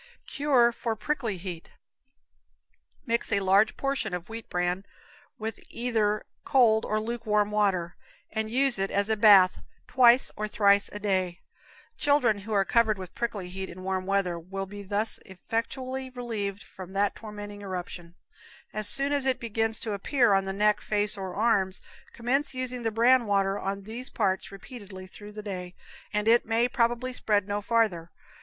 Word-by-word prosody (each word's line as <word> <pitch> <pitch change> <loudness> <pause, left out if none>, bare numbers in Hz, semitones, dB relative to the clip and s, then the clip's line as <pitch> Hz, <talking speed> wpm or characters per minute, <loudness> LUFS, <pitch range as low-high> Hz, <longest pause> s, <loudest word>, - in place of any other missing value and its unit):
Cure 265 -5 +3
for 230 -1 -3
Prickly 230 -4 -2
Heat. 175 -2 -8 1.3
Mix 235 -2 -1
a 200 - +3
large 195 +3 +3
portion 275 -9 -1
of 180 +2 -7
wheat 225 0 -8
bran 180 +1 -1 0.5
with 220 0 -5
either 220 -3 0 0.2
cold 225 -4 +4
or 215 - 0
lukewarm 215 -2 0
water, 190 -5 +1 0.4
and 220 0 -2
use 260 -1 +1
it 195 0 0
as 200 +2 0
a 220 - +3
bath 200 -4 +6 0.3
twice 245 0 +5
or 215 0 -3
thrice 200 -1 +3
a - - -6
day. 190 -4 -1 0.6
Children 270 -8 +3
who 210 +3 -9
are 200 -2 +3
covered 220 -2 +2
with 185 -1 -9
prickly 215 -6 -3
heat 190 +1 -6
in 185 - -10
warm 190 0 -2
weather 195 -3 0
will 195 +3 -5
be 205 +1 -9
thus 205 +3 0
effectually 255 +7 -4
relieved 220 -6 -4
from 190 0 -11
that 200 +1 +1
tormenting 205 -1 -8
eruption. 180 -3 -6 0.6
As 215 0 -1
soon 275 +1 +3
as 285 -2 +2
it 265 -1 +1
begins 225 -1 -1
to 220 - -2
appear 235 +2 +2
on 195 0 +2
the 195 - -2
neck, 210 +1 +2
face 210 0 +2
or 190 -2 -6
arms, 200 -4 +1 0.3
commence 265 +4 -1
using 255 -1 -3
the 225 - 0
bran 235 +2 +4
water 195 0 +1
on 195 +1 -3
these 235 +5 -6
parts 190 -4 -1
repeatedly 195 -2 -10
through 205 +2 -12
the 210 0 -7
day, 180 -3 -6 0.4
and 210 +1 -1
it 235 +1 +5
may 230 +2 +1
probably 240 +1 0
spread 205 -5 0
no 205 0 -2
farther. 205 -7 +1
210 Hz, 165 wpm, -27 LUFS, 195-235 Hz, 1.3 s, bath